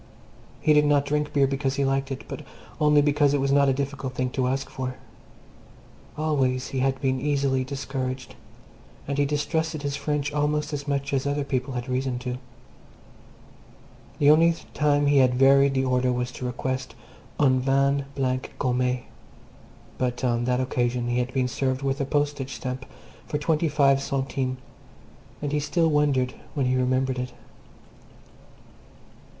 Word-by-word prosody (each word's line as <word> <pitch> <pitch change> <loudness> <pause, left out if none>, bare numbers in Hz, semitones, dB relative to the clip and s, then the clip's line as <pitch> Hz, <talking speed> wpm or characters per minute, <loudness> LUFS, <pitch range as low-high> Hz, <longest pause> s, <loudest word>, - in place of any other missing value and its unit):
He 155 - +4
did 150 0 +5
not 145 -1 +3
drink 150 0 -1
beer 140 -1 +3
because 135 0 -1
he 140 0 +1
liked 135 0 0
it, 135 - -5
but - - -6 0.4
only 150 -1 +5
because 145 -1 +3
it - - +1
was 135 0 +1
not 140 0 +4
a - - +4
difficult 135 -1 -3
thing 125 0 -1
to 130 -2 0
ask 135 +1 -1
for. 130 -1 -5 1.2
Always 135 -5 0
he 135 - -2
had 135 0 +1
been 130 -2 0
easily 140 -2 +1
discouraged, 130 -2 -4 0.7
and 140 0 -2
he 145 - +4
distrusted 155 +1 -1
his 140 -1 -2
French 150 -1 -2
almost 150 +1 0
as 145 0 -4
much 140 0 -1
as 135 0 0
other 145 0 0
people 130 -1 -2
had 120 +1 -4
reason 130 0 -1
to. 125 0 -4 1.8
The 145 0 +6
only 165 +2 +5 0.2
time 145 -1 +2
he 145 -1 +4
had 125 -1 +4
varied 135 +1 +5
the 130 0 +1
order 125 0 +2
was 125 0 -2
to 125 +1 -5
request 130 -1 -3 0.4
"un 130 -3 +4
vin 140 +1 +2
blanc 130 -1 -1
gommée," 125 -1 0 1.0
but 125 -1 -1
on 120 -1 +1
that 125 0 +1
occasion 125 -1 0
he 120 +1 +1
had 125 +1 -1
been 130 -1 +1
served 130 +2 -1
with 135 +1 -1
a - - 0
postage 145 -2 -1
stamp 130 0 -5 0.4
for 150 - -1
twenty 155 +2 +1
five 140 -2 +3
centimes, 135 -1 -2 0.9
and 145 - -1
he 150 - +1
still 165 +3 +1
wondered 145 -4 +2 0.2
when 140 -3 +1
he 125 0 +2
remembered 130 0 +1
it. 125 0 -4
135 Hz, 165 wpm, -25 LUFS, 130-145 Hz, 1.8 s, The